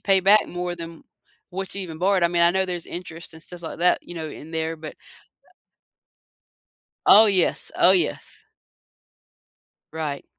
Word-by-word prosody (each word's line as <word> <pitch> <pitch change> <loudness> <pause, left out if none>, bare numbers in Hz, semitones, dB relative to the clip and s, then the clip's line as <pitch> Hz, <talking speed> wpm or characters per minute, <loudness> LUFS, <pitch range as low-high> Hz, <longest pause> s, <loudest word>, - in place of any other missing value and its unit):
pay 195 -1 +3
back 205 +3 +4
more 175 0 -4
than 165 -1 -10 0.5
what 190 +1 -6
you 200 - -2
even 160 -3 -8
borrowed. 190 +1 +1
I - - +4
mean, 170 0 +1
I 170 - +5
know 190 +1 0
there's 175 -2 -5
interest 170 -1 -8
and 160 - -12
stuff 175 -1 -10
like 165 - -7
that, 180 +1 +3
you 175 - -11
know, 160 -1 -5
in 155 +1 -11
there, 160 0 -2
but 155 -1 -9 2.1
Oh, 220 +2 +9
yes. 190 -4 0
Oh, - - +6
yes. 175 -5 -2 1.5
Right. 150 -3 -4
175 Hz, 160 wpm, -23 LUFS, 160-185 Hz, 2.1 s, Oh